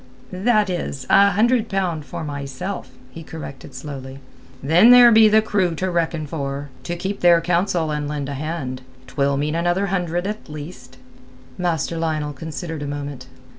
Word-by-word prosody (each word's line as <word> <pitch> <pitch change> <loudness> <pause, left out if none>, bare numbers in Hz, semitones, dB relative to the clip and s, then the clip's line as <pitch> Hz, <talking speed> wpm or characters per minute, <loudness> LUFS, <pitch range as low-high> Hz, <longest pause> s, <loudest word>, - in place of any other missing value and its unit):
"That 210 +2 +2
is, 170 -7 -4
a 200 0 +7
hundred 230 +3 +2
pound 180 -6 -1
for 160 - -6
myself," 140 +5 -5 0.2
he 165 - -9
corrected 155 -4 -9
slowly. 135 -2 -7 0.5
"Then 170 - +6
there 245 -1 +9
be 220 -1 +7
the 215 +1 +4
crew 185 -6 0
to 185 +3 -2
reckon 165 -2 -1
for—to 145 +2 -5
keep 190 +3 -4
their 175 -1 +6
counsel 170 -1 0
and 150 -1 -2
lend 145 -2 -3
a 140 - -4
hand; 140 -3 -4 0.2
'twill 140 +1 0
mean 150 +2 -1
another 175 +4 +1
hundred 175 -1 -1
at 210 +2 -4
the - - -13
least." 145 -4 -10 0.6
Master 170 -2 -1
Lionel 155 -2 -2
considered 160 +2 -6
a 145 - -4
moment. 145 -2 -6
165 Hz, 165 wpm, -21 LUFS, 145-185 Hz, 0.6 s, there